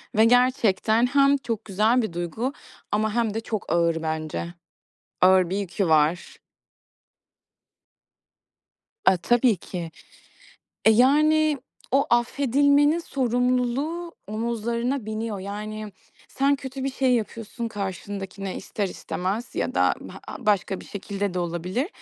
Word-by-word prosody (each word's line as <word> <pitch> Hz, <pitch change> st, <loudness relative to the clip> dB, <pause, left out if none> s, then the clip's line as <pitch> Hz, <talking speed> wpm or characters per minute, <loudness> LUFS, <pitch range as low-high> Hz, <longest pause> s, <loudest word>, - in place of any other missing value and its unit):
ve 220 Hz, +1 st, +6 dB
gerçekten 235 Hz, -2 st, +3 dB
hem 280 Hz, +1 st, +4 dB
çok 230 Hz, -4 st, -4 dB
güzel 220 Hz, +5 st, +2 dB
bir 220 Hz, -7 st, -4 dB
duygu 175 Hz, -, -3 dB, 0.4 s
ama 215 Hz, 0 st, +1 dB
hem 230 Hz, -3 st, +1 dB
de 225 Hz, -, -1 dB
çok 215 Hz, -2 st, -4 dB
ağır 170 Hz, -1 st, +2 dB
bence. 160 Hz, +1 st, -3 dB, 0.7 s
Ağır 185 Hz, -1 st, +5 dB
bir 195 Hz, -, -1 dB
yükü 195 Hz, -1 st, -1 dB
var. 160 Hz, +3 st, +2 dB, 2.7 s
A, 190 Hz, -, +5 dB
tabii 240 Hz, +4 st, +3 dB
ki. 175 Hz, -1 st, -6 dB, 0.9 s
E, -, -, +7 dB
yani, 300 Hz, +5 st, +4 dB, 0.3 s
o 275 Hz, +2 st, +3 dB
affedilmenin 285 Hz, +5 st, +3 dB
sorumluluğu 255 Hz, +5 st, -1 dB
omuzlarına 235 Hz, +3 st, -2 dB
biniyor. 220 Hz, -1 st, -3 dB
Yani, 210 Hz, +1 st, -6 dB, 0.4 s
sen 275 Hz, +1 st, +2 dB
kötü 265 Hz, 0 st, -6 dB
bir 275 Hz, -, 0 dB
şey 260 Hz, -2 st, +2 dB
yapıyorsun 230 Hz, +1 st, -3 dB
karşındakine 195 Hz, -1 st, -5 dB
ister 200 Hz, -2 st, -3 dB
istemez 195 Hz, +6 st, -4 dB
ya -, -, -2 dB
da -, -, +3 dB, 0.3 s
ha -, -, -6 dB
başka 205 Hz, -5 st, 0 dB
bir -, -, -12 dB
şekilde 200 Hz, -1 st, -4 dB
de -, -, -1 dB
olabilir. 180 Hz, -, -2 dB
220 Hz, 120 wpm, -25 LUFS, 195-255 Hz, 2.7 s, E